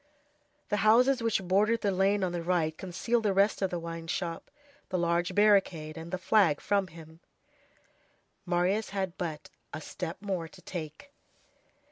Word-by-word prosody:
The 210 - +1
houses 240 +5 +4
which 225 -4 0
bordered 210 +5 +2
the 200 - +1
lane 195 +1 +2
on 180 - 0
the 175 -1 -3
right 165 -2 0
concealed 195 +7 -1
the 210 -3 +1
rest 200 +2 +3
of 190 - +1
the 175 - -3
wine 165 0 -6
shop, 165 0 -4 0.4
the 185 - -1
large 170 0 0
barricade, 190 -7 +3
and 165 +1 -8
the 185 - -2
flag 180 -4 +3
from 200 -2 0
him. 160 -1 -13 1.2
Marius 180 +4 0
had 190 -3 -3
but 160 -4 -5 0.2
a - - -5
step 170 +2 -6
more 190 -5 -3
to - - -16
take. 165 - -7
185 Hz, 160 wpm, -29 LUFS, 170-205 Hz, 1.2 s, houses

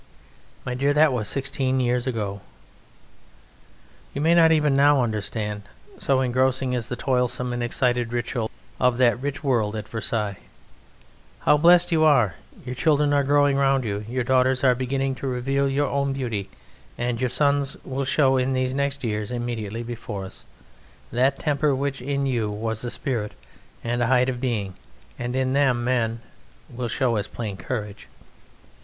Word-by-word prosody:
My 125 - -2
dear, 140 +3 +1
that 150 -1 +4
was 110 -4 -2
sixteen 135 -1 -1
years 125 0 0
ago. 105 -5 -3 1.7
You 140 - -2
may 165 +2 +4
not 165 -1 +6
even 150 -3 +3
now 140 -1 +5
understand, 105 -1 -3 0.4
so 135 -1 +2
engrossing 130 +1 +1
is 120 -3 -2
the 125 - -2
toilsome 125 -1 0
and 120 - -3
excited 120 0 0
ritual 120 -1 -2 0.3
of 125 -1 +3
that 120 -1 +3
rich 145 +1 -4
world 115 -6 +1
at 105 -1 -5
Versailles, 110 -3 -2 1.0
how - - +5
blest 175 +3 +5
you 160 -1 +3
are: 125 - +4 0.3
your 125 - -4
children 145 +1 +2
are 140 -1 +3
growing 145 0 +3
round 135 -1 +2
you: 105 -2 -3
your 125 +1 -1
daughters 130 +1 +2
are 130 -2 +5
beginning 135 +2 -1
to 135 +1 -5
reveal 135 +2 0
your 140 +1 +1
own 140 -1 0
beauty, 115 -7 -3 0.5
and 120 0 -2
your 130 - +1
sons 140 +1 +1
will 135 +1 -3
show 135 0 +3
in 130 +1 +1
these 130 0 0
next 140 0 -2
years 105 -3 -2
immediately 120 -2 -4
before 115 -4 -6
us 95 - -11 0.7
that 130 +3 +2
temper 145 -1 +1
which 135 -1 -2
in 140 +1 -1
you 120 -5 0
was 110 +2 -3
a 120 - -3
spirit 115 -5 -3 0.5
and 120 +1 -1
a 120 - +2
height 125 +1 +3
of 125 -1 -4
being, 110 -7 -2 0.5
and 120 +1 -3
in 130 0 0
them, 130 -4 +2
men, 115 -2 0 0.5
will 120 0 -4
show 120 -1 0
as 100 - -2
plain 110 -4 -5
courage. 105 +1 -5
125 Hz, 165 wpm, -24 LUFS, 115-140 Hz, 1.7 s, not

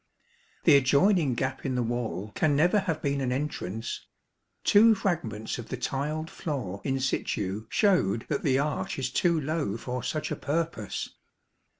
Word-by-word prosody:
The 140 - +7
adjoining 140 - +3
gap 130 +2 -2
in 130 -2 -1
the 125 - +1
wall 110 -4 -3
can 150 -2 +2
never 175 +8 +4
have 165 -6 -2
been 140 -1 0
an 125 -2 0
entrance. 125 -6 -3 0.6
Two 220 +2 +6
fragments 120 - -2
of 120 - -8
the - - -3
tiled 150 +4 -2
floor 125 - -4
in 135 0 0
situ 110 -5 -2
showed 145 - +2
that 145 - -1
the 135 -2 +2
arch 145 +1 -1
is 130 -2 -2
too 170 +3 +2
low 150 -8 -1
for 125 +1 -4
such 155 +4 -3
a - - 0
purpose. 150 -7 -2
140 Hz, 160 wpm, -28 LUFS, 120-155 Hz, 0.6 s, The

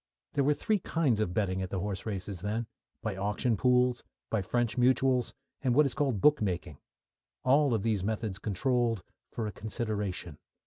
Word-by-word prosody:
There 140 - +2
were 145 +2 +3
three 215 +5 +1
kinds 150 - +1
of 110 -5 0
betting 95 -1 0
at 95 - -3
the 95 - -2
horse 100 +1 -4
races 95 -3 -4
then 110 +4 -1 0.4
by 110 -3 -2
auction 105 +4 0
pools, 125 +2 +3 0.3
by 110 - +1
French 120 +3 0
mutuals, 125 0 +3 0.3
and 125 -3 +2
by - - 0
what 150 - +7
is 135 - -1
called 135 -9 0
bookmaking 105 - +2 0.6
all 135 -1 +4
of 105 - -1
these 110 -4 +1
methods 110 -2 -2
controlled 115 +1 0 0.3
"for 115 - -3
a 105 - -3
consideration." 105 - -4
110 Hz, 175 wpm, -30 LUFS, 100-125 Hz, 0.6 s, what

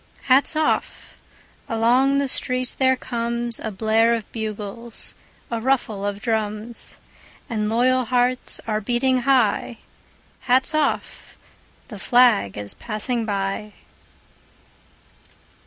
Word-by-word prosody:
Hats 270 +4 +4
off! 310 0 -1 0.5
Along 245 +5 +3
the 280 0 +1
street 255 -1 -2
there 260 -1 +4
comesA 235 -2 -2
blare 220 +3 +2
of 225 -3 -5
bugles, 220 +1 -6 0.4
a 230 -1 -2
ruffle 230 -5 0
of 205 0 -2
drums; 220 0 -2 0.5
And 215 -2 -2
loyal 255 +3 +2
hearts 250 +1 +1
are 215 -1 -1
beating 250 +4 +1
high:Hats 250 +1 0
off! 310 -1 -2 0.5
The 210 -5 -8
flag 235 - +3
is 105 0 -5
passing 225 +2 -3
by! 200 +1 -3
235 Hz, 100 wpm, -22 LUFS, 215-255 Hz, 0.5 s, Hats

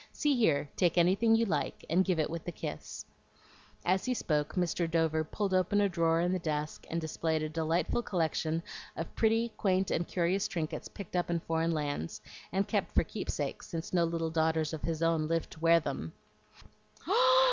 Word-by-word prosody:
See 295 -2 +2
here; 185 - +2
take 175 -1 +2
anything 195 +6 +4
you 230 +1 +3
like, 160 -8 -2
and 180 +3 +3
give 185 -3 0
it 155 - +2
with 165 -1 -4
the 175 - -4
kiss." 75 - -6 0.8
As 185 +2 +2
he 255 0 0
spoke, 150 -8 -1
Mr. 175 -2 0
Dover 160 -1 +2
pulled 195 +4 -2
open 185 +2 +3
a 205 - +4
drawer 165 -2 +2
in 175 +1 +1
the 185 - 0
desk 150 -2 -3
and 165 - -1
displayed 160 0 -1
a 155 - -2
delightful 165 +8 0
collection 165 -4 -1 0.3
of 165 - -5
pretty, 225 +1 +2
quaint, 190 -2 +1
and 170 - 0
curious 180 +2 +1
trinkets 160 -3 -4
picked 195 -3 -9
up 175 -1 0
in 170 -1 +1
foreign 165 +1 0
lands, 145 - -3 0.3
and 195 +2 0
kept - - -1
for - - +5
keepsakes, - - -4
since 165 0 -5
no 175 -2 +4
little 165 -1 -2
daughters 160 -1 +1
of 160 - -4
his 160 +2 -2
own 165 -2 +2
lived 165 0 -1
to - - -12
wear 165 +1 +5
them. 160 - -4
165 Hz, 190 wpm, -31 LUFS, 160-185 Hz, 0.8 s, for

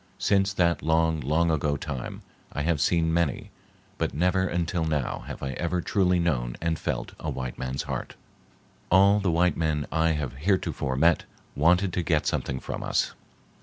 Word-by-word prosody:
Since 100 -1 +2
that 85 -3 +2
long, 80 0 +2
long 80 +5 +1
ago 75 -2 0
time 70 -3 -6 0.3
I 75 - -3
have 80 -2 +1
seen 80 -2 +2
many, 85 -5 0 0.5
but - - -1
never 90 +4 +2
until 85 -1 -1
now 75 -5 -1
have - - -7
I 70 - -2
ever 85 +6 -1
truly 90 0 +2
known 65 -9 0
and 80 -2 -1
felt - - -3
a - - -4
white 65 -2 -5
man's 65 +1 -3
heart. - - -5 0.7
All 100 +3 +6
the 100 -2 0
white 85 0 +2
men 80 -3 0
I 80 0 +2
have 75 -4 -3
heretofore 75 -5 0
met 80 +5 +3 0.3
wanted 90 +5 +3
to 90 - 0
get 80 -2 +1
something 65 -1 -1
from - - -5
us. - - 0
80 Hz, 170 wpm, -26 LUFS, 75-90 Hz, 0.7 s, All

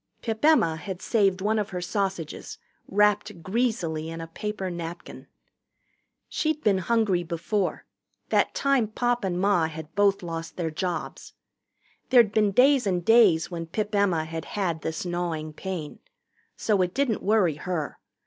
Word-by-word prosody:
Pip 220 0 -3
Emma 240 - +4
had 185 +1 -6
saved 195 -4 +1
one 215 +2 +1
of 210 0 -2
her 180 - -4
sausages, 190 -3 -3 0.3
wrapped 210 -2 +1
greasily 185 -7 -1
in 165 0 -6
a 165 - -5
paper 190 +3 -4
napkin. 170 0 -7 1.0
She'd 310 -1 -1
been 200 -3 +3
hungry 210 -2 +1
before 175 +4 -2 0.4
that - - +2
time 275 -5 +2
Pop 240 +2 -1
and 180 -2 -1
Ma 185 -4 +3
had 160 0 -9
both 200 -2 +2
lost 165 -1 -6
their 165 -3 -2
jobs. 175 0 -4 0.8
There'd 240 -5 +6
been 210 -1 +3
days 255 +2 +4
and 180 -3 0
days 195 -8 +5
when 165 -1 -5
Pip 210 +5 -3
Emma 190 -6 +2
had 160 0 -6
had 175 -6 -2
this 160 +2 -4
gnawing 170 -3 -3
pain. 175 -3 -6 0.6
So 205 -3 +1
it 180 0 -1
didn't 265 -5 0
worry 195 -8 +2
her. 160 -2 -4
190 Hz, 150 wpm, -26 LUFS, 165-215 Hz, 1.0 s, There'd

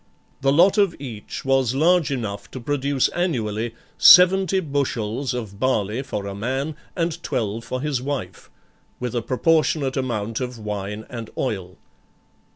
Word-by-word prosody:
The 135 0 +3
lot 180 +8 +5
of 195 -4 +3
each 120 -5 -7
was 135 -2 +2
large 165 +2 +3
enough 110 -7 -4
to 130 - -7
produce 140 +1 0
annually 115 - -2 0.2
seventy 190 +1 +7
bushels 135 - -2
of 105 -5 -6
barley 115 -2 0
for 105 -7 -5
a 100 - -4
man 135 +9 -3 0.2
and 170 -1 -2
twelve 115 -6 -2
for 130 +2 -4
his 145 -4 -1
wife, 135 -9 -5 0.5
with 125 -1 -3
a 120 - 0
proportionate 145 +2 +1
amount 115 -5 -2
of 125 -1 -4
wine 105 0 -5
and 115 -3 -7
oil. 95 -8 -3
130 Hz, 145 wpm, -23 LUFS, 110-145 Hz, 0.5 s, seventy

